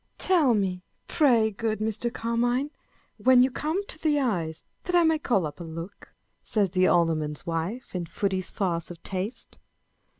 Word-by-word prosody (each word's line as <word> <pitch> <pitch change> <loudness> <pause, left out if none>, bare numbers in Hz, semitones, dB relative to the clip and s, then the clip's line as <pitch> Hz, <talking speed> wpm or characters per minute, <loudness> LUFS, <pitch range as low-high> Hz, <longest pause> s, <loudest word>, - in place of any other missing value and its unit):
" - - -46
Tell 315 -10 +4
me, 185 -3 -1 0.3
pray 235 -7 +3
good 220 +1 -2
Mr. 220 +2 -1
Carmine, 240 +5 0 0.5
when 255 -1 +6
you 260 - +2
come 320 +9 -2
to 315 - -7
the 300 -2 +2
eyes, 175 - -2 0.2
that 360 - 0
I 345 - +6
may 320 -1 +3
call 200 - +1
up 150 +2 -7
a - - -6
look," 165 +4 -9 0.3
says 205 -5 0
the 185 0 +3
Alderman's 160 -3 +1
wife, 170 +9 -3
in 175 -2 -3
Foote's 190 +1 -2
farce 170 -4 -2
of 170 -1 -11
Taste. 195 +5 -5
215 Hz, 170 wpm, -26 LUFS, 175-255 Hz, 0.5 s, when